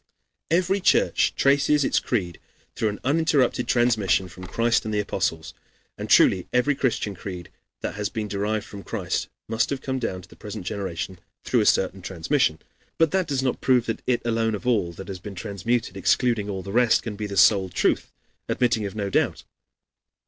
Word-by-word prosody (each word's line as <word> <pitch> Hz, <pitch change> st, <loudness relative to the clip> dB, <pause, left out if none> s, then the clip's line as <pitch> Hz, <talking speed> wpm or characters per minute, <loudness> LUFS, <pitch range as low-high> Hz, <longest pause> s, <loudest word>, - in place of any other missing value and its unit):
Every 185 Hz, +4 st, +2 dB
church -, -, +3 dB
traces 140 Hz, +1 st, +3 dB
its -, -, +2 dB
creed 90 Hz, -9 st, -2 dB, 0.4 s
through 110 Hz, -, 0 dB
an 105 Hz, -, -6 dB
uninterrupted 140 Hz, -4 st, +2 dB
transmission 110 Hz, -7 st, +2 dB
from 90 Hz, +1 st, -10 dB
Christ 115 Hz, 0 st, +1 dB
and 110 Hz, -, -4 dB
the 105 Hz, -, 0 dB
Apostles. 95 Hz, -5 st, -2 dB, 0.4 s
And -, -, -6 dB
truly 90 Hz, -2 st, +5 dB
every 125 Hz, +4 st, +2 dB
Christian 125 Hz, -6 st, -1 dB
creed 90 Hz, -2 st, -8 dB, 0.3 s
that -, -, -3 dB
has 105 Hz, 0 st, -3 dB
been 110 Hz, -2 st, -4 dB
derived 105 Hz, +1 st, -2 dB
from 100 Hz, -, -9 dB
Christ -, -, -3 dB, 0.2 s
must 115 Hz, +1 st, 0 dB
have 140 Hz, -2 st, -3 dB
come 130 Hz, -1 st, -2 dB
down 95 Hz, -6 st, -3 dB
to -, -, -15 dB
the -, -, -16 dB
present 105 Hz, -3 st, -8 dB
generation 95 Hz, -2 st, -4 dB, 0.2 s
through -, -, +1 dB
a -, -, +1 dB
certain -, -, +2 dB
transmission. 85 Hz, -, 0 dB, 0.4 s
But 165 Hz, -2 st, +3 dB
that 185 Hz, -3 st, +1 dB
does 135 Hz, -2 st, -1 dB
not 130 Hz, -, -1 dB
prove 125 Hz, -3 st, +3 dB
that 115 Hz, -, -3 dB
it 125 Hz, -2 st, +1 dB
alone 115 Hz, -1 st, +1 dB
of 105 Hz, -, -8 dB
all 110 Hz, -9 st, +1 dB
that 95 Hz, +3 st, -10 dB
has 95 Hz, -2 st, -6 dB
been 100 Hz, +1 st, -8 dB
transmuted, 110 Hz, +5 st, -2 dB
excluding 115 Hz, -5 st, +1 dB
all 95 Hz, -2 st, -4 dB
the 100 Hz, -, -7 dB
rest, 120 Hz, +1 st, +3 dB
can 110 Hz, -3 st, -5 dB
be 105 Hz, 0 st, -4 dB
the 100 Hz, -1 st, -5 dB
sole 95 Hz, 0 st, +5 dB
truth, 90 Hz, -, 0 dB, 0.4 s
admitting 115 Hz, -4 st, +1 dB
of 100 Hz, -, -9 dB
no 100 Hz, -2 st, -3 dB
doubt. -, -, 0 dB
110 Hz, 190 wpm, -24 LUFS, 95-125 Hz, 0.4 s, truly